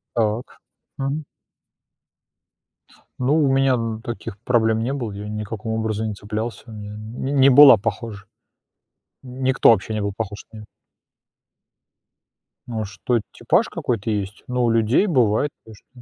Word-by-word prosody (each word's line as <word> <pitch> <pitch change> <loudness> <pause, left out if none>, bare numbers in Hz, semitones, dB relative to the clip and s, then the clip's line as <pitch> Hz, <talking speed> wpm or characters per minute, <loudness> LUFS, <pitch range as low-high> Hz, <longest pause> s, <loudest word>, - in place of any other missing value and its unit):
Так, 110 +1 -1 0.4
мгм. 140 +3 -2 2.0
Ну, 135 +5 +2
у 145 -4 +3
меня 135 -1 +3
н 115 -2 -2
таких 115 -4 -7
проблем 110 -2 +2
не 130 +4 -1
было, 120 -7 -4
я 100 +1 -7
никаком 105 +1 -5
образом 110 0 -2
не 110 - -3
цеплялся, 105 +3 -5
я 110 - -10 0.2
не 115 +6 -5
не 140 -1 +6
была 135 -1 +9
похожа, 105 0 -4 1.0
никто 130 +1 +3
вообще 110 0 +1
не 110 - -1
был 100 -1 -2
похож 105 -2 -5
на 110 - -10
неё. 105 - -10 2.0
А 110 -3 -3
что, 105 +5 -1
типаж 175 - +1
какой-то 120 - -3
есть, 100 0 -4
но 125 0 0
у 120 - +3
людей 115 - +3
бывает, 130 - +2
конечно. 110 -2 -16
115 Hz, 140 wpm, -22 LUFS, 105-130 Hz, 2.0 s, была